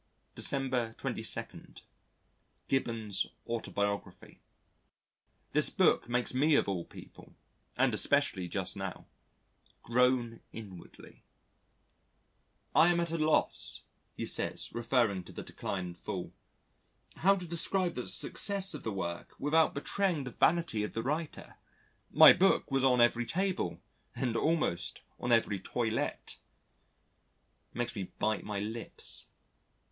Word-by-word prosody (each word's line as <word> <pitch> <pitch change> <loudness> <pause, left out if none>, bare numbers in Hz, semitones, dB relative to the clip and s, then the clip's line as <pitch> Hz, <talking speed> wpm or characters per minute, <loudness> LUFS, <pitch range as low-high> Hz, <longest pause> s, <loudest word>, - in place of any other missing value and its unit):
December 130 -4 0
22. - - -1 0.9
Gibbon's 115 -6 -1 0.2
Autobiography 100 -3 -4 1.1
This - - +5
book - - +2
makes 125 +1 0
me 145 +4 +3
of - - +3
all 90 -4 -2
people - - -14 0.4
(and 130 -1 +3
especially 110 -6 +1
just - - -2
now) - - -6 0.8
groan 120 -1 +2
inwardly. 95 -6 -12 1.5
"I 165 - +6
am 170 - +1
at 170 -1 0
a 165 - -1
loss," 155 0 +1 0.3
he - - -4
says, - - -1
referring 115 -5 +1
to - - -11
the - - -7
Decline 95 -2 -4
and 90 -1 -8
Fall, - - -5 0.8
"how 195 +3 +4
to 180 -2 -6
describe 175 +2 -1
the 125 - -5
success 200 -1 -1
of - - -6
the 110 - -3
work 85 -3 -5
without 155 +3 +2
betraying 170 +1 0
the 125 - -6
vanity 160 -7 +2
of 105 - -5
the 115 - -2
writer.... 150 +4 -4 0.5
My - - +9
book 190 -5 +2
was 135 -1 +1
on 125 -2 +4
every 120 0 +3
table 190 +1 -1 0.3
and 120 -3 -1
almost 155 - 0 0.2
on 125 - -2
every 115 -4 +3
toilette." 115 +3 -2 1.3
It - - -13
makes 120 0 -2
me 95 -3 -5
bite 110 0 0
my 105 -1 -4
lips. 110 +3 -4
120 Hz, 125 wpm, -31 LUFS, 110-155 Hz, 1.5 s, My